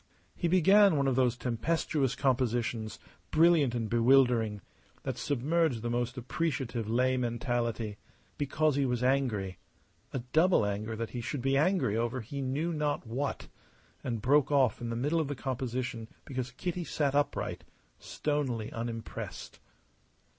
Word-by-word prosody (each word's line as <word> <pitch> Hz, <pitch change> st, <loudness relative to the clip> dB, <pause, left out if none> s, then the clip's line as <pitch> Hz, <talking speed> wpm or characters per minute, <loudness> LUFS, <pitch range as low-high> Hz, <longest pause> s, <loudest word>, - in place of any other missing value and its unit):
He 175 Hz, -, -1 dB
began 190 Hz, +2 st, +6 dB
one 140 Hz, -1 st, +2 dB
of 130 Hz, -, +2 dB
those 125 Hz, -2 st, +2 dB
tempestuous 130 Hz, +3 st, 0 dB
compositions, 120 Hz, -4 st, 0 dB, 0.3 s
brilliant 155 Hz, -6 st, +4 dB
and 115 Hz, -2 st, -1 dB
bewildering, 120 Hz, -3 st, +3 dB, 0.4 s
that -, -, -2 dB
submerge 145 Hz, -1 st, +1 dB
the 120 Hz, +1 st, -2 dB
most 120 Hz, +2 st, -1 dB
appreciative 125 Hz, -4 st, -2 dB
lay 130 Hz, +3 st, +2 dB
mentality 115 Hz, -3 st, -2 dB, 0.4 s
because 150 Hz, +1 st, +1 dB
he 140 Hz, -, +2 dB
was 125 Hz, -2 st, 0 dB
angry, 125 Hz, -8 st, 0 dB, 0.5 s
a -, -, -2 dB
double 155 Hz, -, +3 dB
anger 105 Hz, +2 st, -3 dB
that 115 Hz, 0 st, -4 dB
he 120 Hz, -, -4 dB
should 125 Hz, +2 st, -4 dB
be 135 Hz, 0 st, +2 dB
angry 140 Hz, -, +2 dB
over 120 Hz, +3 st, -1 dB
he 140 Hz, +5 st, -6 dB
knew 145 Hz, +6 st, -1 dB
not 150 Hz, -3 st, -1 dB
what 130 Hz, +5 st, -3 dB, 0.6 s
and 115 Hz, -4 st, -3 dB
broke 145 Hz, +2 st, +4 dB
off 130 Hz, -7 st, +3 dB
in 120 Hz, -, -3 dB
the 115 Hz, -, -2 dB
middle 145 Hz, +8 st, +1 dB
of 155 Hz, -, -2 dB
the 145 Hz, -, -3 dB
composition 125 Hz, -3 st, -3 dB, 0.2 s
because 130 Hz, -2 st, -4 dB
Kitty 175 Hz, +7 st, -4 dB
sat 145 Hz, -4 st, 0 dB
upright, 145 Hz, 0 st, -1 dB, 0.4 s
stonily 135 Hz, -7 st, -2 dB
unimpressed. 115 Hz, -2 st, -6 dB
130 Hz, 145 wpm, -30 LUFS, 115-145 Hz, 0.6 s, began